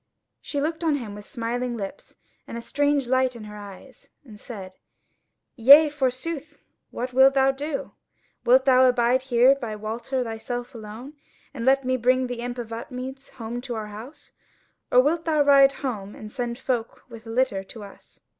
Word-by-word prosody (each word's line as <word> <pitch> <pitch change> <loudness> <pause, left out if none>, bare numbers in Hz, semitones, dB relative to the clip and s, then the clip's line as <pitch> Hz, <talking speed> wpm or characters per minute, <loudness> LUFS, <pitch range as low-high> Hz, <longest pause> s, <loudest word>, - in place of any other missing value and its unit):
She 285 - -4
looked 320 +3 -2
on 315 -3 +2
him 230 -7 -5
with 205 0 -11
smiling 240 +1 -3
lips 200 +7 -8 0.3
and 230 - -6
a - - -5
strange 285 +2 +1
light 260 0 +1
in 230 - -9
her 210 0 -9
eyes, 205 +5 -12 0.2
and 215 -5 -13
said: 195 -6 -9 0.8
"Yea, 285 +5 +8
forsooth, 295 +2 -3 0.3
what 250 +1 -5
wilt 265 +1 +6
thou 270 0 +4
do? 280 +1 -5 0.5
Wilt 260 +2 +5
thou 260 -1 +6
abide 245 +1 +2
here 255 0 +4
by 235 -6 -5
Walter 230 +5 -3
thyself 240 +2 -5
alone, 225 +5 -9 0.4
and 235 -4 -5
let 270 0 +3
me 255 0 +1
bring 255 +1 +2
the 245 -1 -5
imp 245 +1 -4
of 230 -2 -6
Upmeads 255 +3 -7
home 235 0 -6
to 245 -2 -5
our 215 -1 -5
house? 230 +8 -11 0.6
Or 250 - +6
wilt 325 +5 0
thou 310 -3 +3
ride 275 -1 +6
home 210 -6 -4
and 215 -1 -10
send 240 -1 -3
folk 245 -3 -3
with 230 -2 -12
a - - -8
litter 225 -5 0
to 220 +2 -10
us? 200 - -15
250 Hz, 180 wpm, -24 LUFS, 230-270 Hz, 0.8 s, Yea